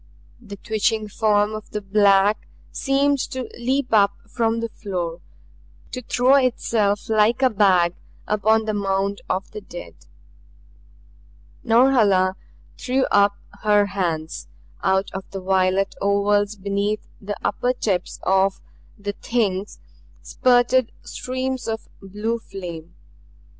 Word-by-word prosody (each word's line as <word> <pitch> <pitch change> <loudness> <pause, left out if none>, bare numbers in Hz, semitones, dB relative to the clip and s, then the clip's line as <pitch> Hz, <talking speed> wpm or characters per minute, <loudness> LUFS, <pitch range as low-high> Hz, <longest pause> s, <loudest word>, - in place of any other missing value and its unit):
The 205 -4 -9
twitching 215 +1 -1
form 210 0 +2
of 215 -1 -7
the 210 - -3
black 200 0 +3 0.2
seemed 280 +1 +1
to 260 0 -4 0.2
leap 260 +2 0
up 200 -2 +5
from 225 +1 0
the 230 0 -3
floor, 175 -6 -5 0.7
to 255 - -5
throw 250 +2 +2
itself 225 -5 +1
like 220 +4 +2
a 260 - +4
bag 185 -5 +3 0.3
upon 215 +1 +2
the 215 - -1
mound 200 0 -1
of 185 +1 -2
the 210 - -7
dead. 175 - -10 1.7
Norhala 225 -6 +4 0.4
threw 260 +1 +1
up 200 0 +4 0.3
her 210 -1 +4
hands. 170 - -3 0.3
Out 190 0 +1
of 190 0 -7
the 195 - -6
violet 190 +1 +1
ovals 205 +1 +2
beneath 200 +2 -2
the 205 0 -4
upper 245 +4 0
tips 205 -7 -2
of 190 +1 +2 0.4
the 205 -1 -4
Things 205 -4 -2 0.5
spurted 250 0 +2
streams 260 0 -4
of 225 -1 -4
blue 210 +4 -3
flame. 175 -5 -9
205 Hz, 120 wpm, -22 LUFS, 195-230 Hz, 1.7 s, up